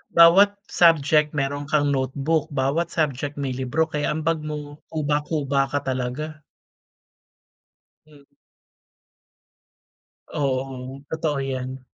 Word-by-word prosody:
bawat 190 +5 +7 0.2
subject 155 -2 +4
meron 145 0 -2
kang 145 0 +2
notebook. 140 +4 0
Bawat 145 +3 0
subject, 145 -3 -2
may 140 -2 -3
libro. 130 +5 0
Kaya 150 0 -1
ang 160 - -3
bag 165 0 +1
mo, 150 -1 -6
kuba-kuba 145 -2 0
ka 145 0 -2
talaga. 130 +4 -3 1.7
Mm. 145 -2 -21 2.0
Oo, 135 -1 -3
totoo 155 -3 -1
'yan. 130 -1 -4
145 Hz, 100 wpm, -23 LUFS, 135-155 Hz, 2.0 s, bawat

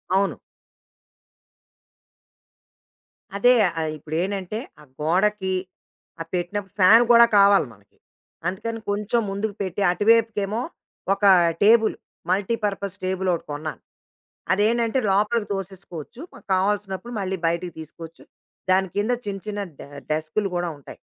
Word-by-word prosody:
అవును. 195 0 +1 3.0
అదే 245 +5 +5 0.3
ఆహ్, 160 -1 -1
ఇప్పుడేంటంటే, 185 +7 -3 0.2
ఆ - - -14 0.2
గోడకి 190 +4 +1 0.7
ఆ - - -1
పెట్టినప్పుడు 185 +2 -3
ఫ్యాన్ 220 +6 +8
గూడా 235 0 +8
కావాలి 200 -6 +5
మనకి. 100 -1 -26 0.5
అందుకని 225 +5 -3
కొంచెం 210 +3 0
ముందుకు 200 +1 -3
పెట్టి 190 0 -3
అటువైపుకేమో 215 +1 +2 0.5
ఒకా 200 0 +4 0.3
టేబులు, 220 +1 +5 0.3
మల్టీ 200 +4 +1
పర్పస్ 200 -1 -3
టేబులొకటి 185 -2 -1
కొన్నాను. 150 +1 -5 0.7
అదేంటంటే, 230 +5 +1
లోపలికి 210 +3 +1
తోసేసుకోవచ్చు. 190 - -8
మ - - -12 0.2
కావాల్సినప్పుడు 200 +3 -1
మళ్ళీ 190 -1 -3
బయటికి 170 +1 -2
తీసుకోవచ్చు. 160 +1 -11 0.5
దాని 190 +1 +3
కింద 210 +4 +1 0.2
చిన్న, 195 -1 -3
చిన్న 205 -1 -3 0.2
డె - - -11 0.2
డెస్కు‌లు 160 +6 -1
గూడా 175 0 -1
ఉంటాయి. 140 - -13
195 Hz, 110 wpm, -23 LUFS, 180-210 Hz, 3.0 s, ఫ్యాన్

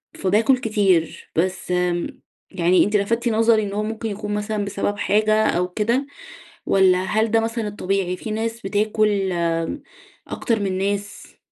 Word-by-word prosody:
فباكل 220 +7 +2
كتير، 200 -8 0
بس 185 +2 -1
آمم، 180 -1 -1 0.3
يعني 180 -1 +3
أنتِ 210 +1 -1
لفتِ 230 +4 +1
نظري 225 0 +3
إن 200 -1 -4
هو 210 +1 -1
ممكن 220 +1 -4
يكون 210 +1 -4
مثلًا 210 0 -2
بسبب 205 +1 -2
حاجة 215 +1 +2
أو 180 -3 +1
كده 230 +8 0 0.6
والّا 190 -2 +4
هل 220 +3 +1
ده 225 +1 +3
مثلًا 225 -1 -2
الطبيعي 195 -2 -2
في 220 - -7
ناس 225 +2 -3
بتاكل 205 -2 0 1.0
أكتر 230 -2 -1
من 190 -2 -1
ناس؟ 205 +1 -4
205 Hz, 145 wpm, -22 LUFS, 190-220 Hz, 1.0 s, والّا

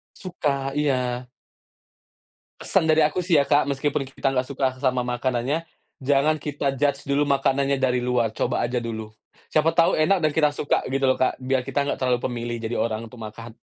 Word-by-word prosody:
Suka, 140 -7 -2
iya. 125 -4 0 1.3
Pesan - - +1
dari 160 0 +4
aku 150 +4 +2
sih 180 - 0
ya 140 - +2
Kak, 145 - +4
meskipun 140 0 -1
kita 135 +1 -2
nggak 130 -1 0
suka 135 0 -2
sesama 130 -1 +1
makanannya, 125 +5 -1 0.4
jangan 140 +3 +2
kita 145 -2 -2
judge 140 0 +1
dulu 140 +1 +2
makananya 140 0 +1
dari 125 -1 +2
luar, 125 -2 +1
coba 110 - -1
aja 125 +1 -1
dulu. 110 -2 -4 0.4
Siapa 155 +1 +3
tahu 165 0 +3
enak 175 +4 +3
dan 155 -1 +2
kita 150 -1 +3
suka 145 - 0
gitu 135 +1 0
loh 130 - +2
Kak, 130 - +1
biar 130 0 +1
kita 135 +1 0
nggak - - -2
terlalu 125 -2 +1
pemilih 120 -1 -3
jadi 115 +1 -3
orang 115 0 -2
tuh 125 - -14
makan. 110 +2 -8
135 Hz, 185 wpm, -24 LUFS, 125-145 Hz, 1.3 s, dari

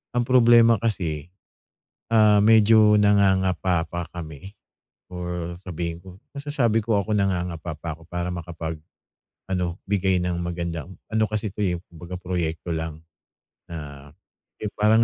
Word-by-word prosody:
Ang 120 - +3
problema 120 -2 +6
kasi, 85 -9 -2 0.8
ah, 105 -2 +5
medyo 110 0 +6
nangangapa 95 -4 +3
pa 85 +1 -5
kami 85 +4 -9 0.6
or 90 -1 -4
sabihin 85 -1 -4
ko 90 0 -13 0.2
masasabi 140 -6 +1
ko 110 -3 +2
ako 110 - -8
nangangapa 90 -4 -1
pa 80 -1 -5
ko 80 - -17
para 90 0 -3
makapag 85 -2 -5 0.7
ano, 90 -1 -1
bigay 95 -2 +2
ng 90 -1 -1
magandang 85 0 -4
ano 110 0 +2
kasi 110 0 -2
ito, - - -12
eh, 90 -3 +1 0.2
kumbaga 85 +2 -8
proyekto 85 -2 -3
lang 80 -1 -5 0.7
na 75 -3 -8 0.5
yung 105 -2 -4
parang 110 +2 +5
90 Hz, 130 wpm, -24 LUFS, 85-105 Hz, 0.8 s, problema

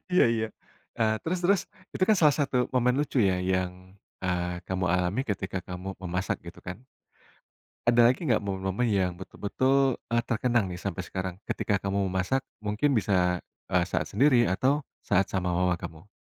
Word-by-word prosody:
Iya 180 - +6
iya, 110 -1 0 0.5
eee, 110 -1 +3
terus 180 +3 -1
terus, 195 +1 +4 0.3
itu - - -3
kan 215 - +6
salah 150 -3 +5
satu 140 -3 0 0.2
momen 125 0 +3
lucu 145 -2 0
ya 95 -2 +3
yang, 95 -1 +1 0.5
eee, 90 -1 -1
kamu 95 0 -1
alami 90 +6 +1
ketika 95 -2 -2
kamu 90 +1 -6
memasak, 90 +1 -1
gitu - - -10
kan. 90 0 -5 1.1
Ada 120 0 +6
lagi 130 - -10
nggak, 110 -3 +3
momen-momen 95 +4 -1
yang 95 -4 +1
betul-betul, 130 +7 +1
eee, 120 0 +2
terkenang 120 -1 +2
nih 90 - -6
sampai - - -3
sekarang 95 -1 -4
ketika 105 - 0
kamu 100 0 0
memasak? 95 +9 0 0.2
Mungkin 105 +8 +1
bisa, 90 -3 +1 0.3
eee, 90 -1 +3
saat - - -1
sendiri 125 +1 +4
atau 135 +10 +1 0.2
saat 95 +2 +3
sama 90 -2 -1
mama 90 0 +2
kamu? 80 +5 -9
100 Hz, 165 wpm, -28 LUFS, 90-125 Hz, 1.1 s, Iya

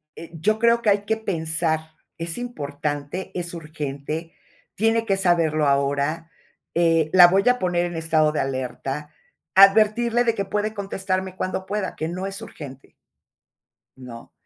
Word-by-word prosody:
eh, 165 - -10
yo 205 +7 0
creo 235 0 +3
que 220 - +1
hay 205 0 +4
que 220 +1 0
pensar: 160 -5 -1 0.2
"¿Es 165 0 -1
importante?, 145 -7 -5
¿es 175 -1 -3
urgente?, 155 0 -6 0.4
¿tiene 225 +2 +1
que 195 -3 +1
saberlo 165 -5 +2
ahora?". 140 +4 0 0.4
Eh, 165 -2 +2
"¿la 180 -2 +9
voy 190 +3 +2
a 250 0 +2
poner 175 -1 0
en 175 -1 -5
estado 160 -1 +2
de 150 - -2
alerta?". 135 +2 -4 0.4
Advertirle, 215 +4 +5
de 230 -1 +2
que 200 - -2
puede 210 +2 -2
contestarme 190 -2 -3
cuando 185 0 -3
pueda. 200 -1 -3
Que 160 - -3
no 180 +3 -4
es 195 +2 -5
urgente 140 - -11 1.1
¿no? 125 -3 -11
170 Hz, 150 wpm, -23 LUFS, 155-200 Hz, 1.1 s, la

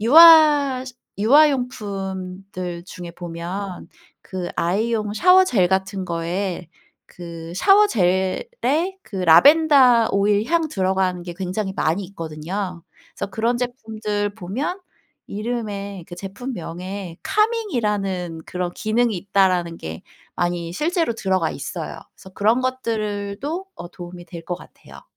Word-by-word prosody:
유아 295 0 +7
시 255 - -9 0.2
유아용품들 195 - 0
중에 175 -1 -8
보면 175 +3 -6 0.4
그 185 -2 -5
아이용 210 +4 0
샤워젤 365 - +5
같은 190 +1 -1
거에 175 +1 -3 0.4
그 170 -1 -9
샤워젤에 200 - +3 0.5
그 200 - -9
라벤더 255 - +6
오일 205 +2 +2
향 330 0 +1
들어가는 190 - 0
게 175 -1 -7
굉장히 190 +1 -3
많이 165 +6 0
있거든요. 175 +1 -5 0.3
그래서 - - -5
그런 230 +4 0
제품들 215 -4 -3
보면 240 - -4 0.5
이름에 205 -4 -4
그 175 - -9
제품명에 190 -3 -6
카밍 440 0 +1
이라는 195 - -1
그런 180 -1 -3
기능이 225 +1 +1
있다라는 180 -2 +1
게 80 0 -7 0.4
많이 175 -1 -1
실제로 325 - 0
들어가 190 -6 0 0.4
있어요. - - -9 0.2
그래서 190 - -14
그런 220 +5 +2
것들을 215 -6 -2
도 330 +7 -4
어 - - -8
도움이 175 0 -10
될 170 -3 -9
것 175 - -2
같아요. - - -15
200 Hz, 265 characters per minute, -22 LUFS, 180-240 Hz, 0.5 s, 유아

